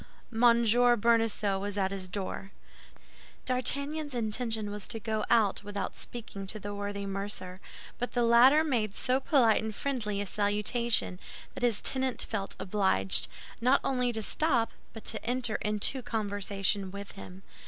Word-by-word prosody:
M. 225 Hz, -, -4 dB, 0.6 s
Bonacieux 225 Hz, -3 st, +2 dB
was 205 Hz, +1 st, -4 dB
at 190 Hz, -1 st, 0 dB
his 190 Hz, -1 st, -4 dB
door. 195 Hz, +1 st, -5 dB, 1.0 s
D'Artagnan's 280 Hz, +3 st, -1 dB
intention 220 Hz, -2 st, -2 dB
was 205 Hz, -1 st, -3 dB
to 225 Hz, -, -4 dB
go 215 Hz, 0 st, -2 dB
out 215 Hz, -4 st, +3 dB
without 205 Hz, 0 st, -4 dB
speaking 210 Hz, -5 st, -6 dB
to 215 Hz, +2 st, -3 dB
the 205 Hz, 0 st, -6 dB
worthy 205 Hz, 0 st, -4 dB
mercer; 195 Hz, -1 st, -4 dB, 0.4 s
but 245 Hz, -, -3 dB
the 245 Hz, -, +1 dB
latter 250 Hz, +6 st, +6 dB
made 230 Hz, -9 st, 0 dB
so 255 Hz, +1 st, +1 dB
polite 255 Hz, -6 st, +3 dB
and 220 Hz, -1 st, -4 dB
friendly 220 Hz, -7 st, -2 dB
a 205 Hz, -, -1 dB
salutation 210 Hz, 0 st, +1 dB, 0.3 s
that -, -, -8 dB
his 240 Hz, -4 st, +2 dB
tenant 260 Hz, -1 st, 0 dB
felt 200 Hz, -3 st, -4 dB
obliged, 190 Hz, -, +2 dB, 0.3 s
not 255 Hz, +3 st, +4 dB
only 250 Hz, -2 st, +1 dB
to 220 Hz, -2 st, 0 dB
stop, 255 Hz, -3 st, +2 dB, 0.2 s
but 225 Hz, -, -11 dB
to 220 Hz, -, -3 dB
enter 240 Hz, -2 st, 0 dB
into 210 Hz, +5 st, +1 dB
conversation 205 Hz, -4 st, -1 dB
with 200 Hz, +1 st, -7 dB
him. 190 Hz, -1 st, -11 dB
215 Hz, 150 wpm, -29 LUFS, 200-245 Hz, 1.0 s, latter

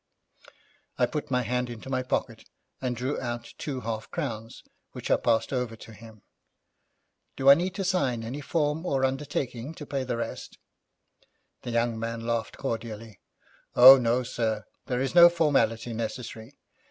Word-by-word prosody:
I 125 Hz, -, +4 dB
put 150 Hz, +5 st, -4 dB
my 125 Hz, -1 st, +1 dB
hand 125 Hz, +1 st, -1 dB
into 120 Hz, +1 st, -9 dB
my 130 Hz, -1 st, -1 dB
pocket, 125 Hz, -, -3 dB, 0.3 s
and 125 Hz, -2 st, -1 dB
drew 130 Hz, +4 st, -3 dB
out 120 Hz, -1 st, -5 dB
two 135 Hz, -4 st, -4 dB
half 110 Hz, -1 st, -4 dB
crowns, 115 Hz, -8 st, -5 dB, 0.3 s
which -, -, -5 dB
I -, -, +7 dB
passed 115 Hz, +4 st, +1 dB
over 125 Hz, -3 st, -2 dB
to 110 Hz, 0 st, -13 dB
him. 110 Hz, -1 st, -14 dB, 1.1 s
'Do 135 Hz, +1 st, +6 dB
I -, -, +12 dB
need 180 Hz, +5 st, -1 dB
to 195 Hz, -, -2 dB
sign 135 Hz, -12 st, 0 dB
any 130 Hz, +6 st, -5 dB
form 150 Hz, +1 st, -1 dB
or 135 Hz, -7 st, +1 dB
undertaking 135 Hz, 0 st, -3 dB
to 150 Hz, -, -8 dB
pay 140 Hz, -2 st, -2 dB
the 125 Hz, -2 st, -3 dB
rest?' 115 Hz, -, -6 dB, 1.0 s
The -, -, -6 dB
young 115 Hz, -1 st, 0 dB
man 115 Hz, 0 st, -4 dB
laughed 115 Hz, -1 st, -2 dB
cordially. 115 Hz, -4 st, -5 dB, 0.6 s
'Oh, 130 Hz, +2 st, +10 dB
no, 120 Hz, +1 st, +1 dB
sir, 110 Hz, -3 st, -2 dB, 0.2 s
there 125 Hz, 0 st, -1 dB
is 135 Hz, -, -2 dB
no 175 Hz, 0 st, +9 dB
formality 120 Hz, -9 st, +1 dB
necessary. 115 Hz, +2 st, -6 dB
125 Hz, 160 wpm, -27 LUFS, 115-140 Hz, 1.1 s, I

